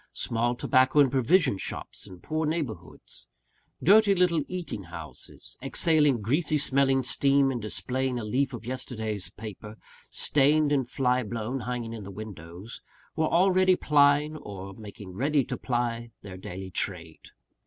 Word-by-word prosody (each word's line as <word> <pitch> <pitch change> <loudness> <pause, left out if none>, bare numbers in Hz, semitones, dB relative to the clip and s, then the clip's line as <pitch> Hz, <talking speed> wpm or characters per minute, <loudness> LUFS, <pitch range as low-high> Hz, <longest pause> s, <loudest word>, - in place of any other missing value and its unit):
Small 120 +1 -1
tobacco 130 +3 +3
and 140 -3 +5
provision 135 - +3
shops - - -6
in 90 -1 -12
poor 155 0 -2
neighbourhoods; 150 -8 -6 0.6
dirty 205 0 +6
little 175 -3 +2
eating 175 - -5
houses, 85 -2 -11
exhaling 150 -7 +3
greasy 150 - +2
smelling 135 -2 +2
steam, 140 +1 +3
and 120 -3 -3
displaying 130 +4 -2
a 120 - -4
leaf 130 +6 0
of 120 -3 -8
yesterday's 110 -5 -3
paper, 110 0 -9 0.3
stained 145 +1 +2
and 135 -4 +1
fly 125 -1 +1
blown, 115 +3 -4
hanging 120 -2 -4
in 115 - -7
the 100 - -8
windows 95 0 -9 0.3
were 160 0 +1
already 185 +1 +4
plying, 150 0 +3
or 95 -6 -8
making 100 -2 -10
ready 140 +6 +1
to - - -4
ply, 120 -2 -2
their 95 -2 -8
daily 95 +1 -8
trade. 85 -4 -4
125 Hz, 145 wpm, -27 LUFS, 110-145 Hz, 0.6 s, dirty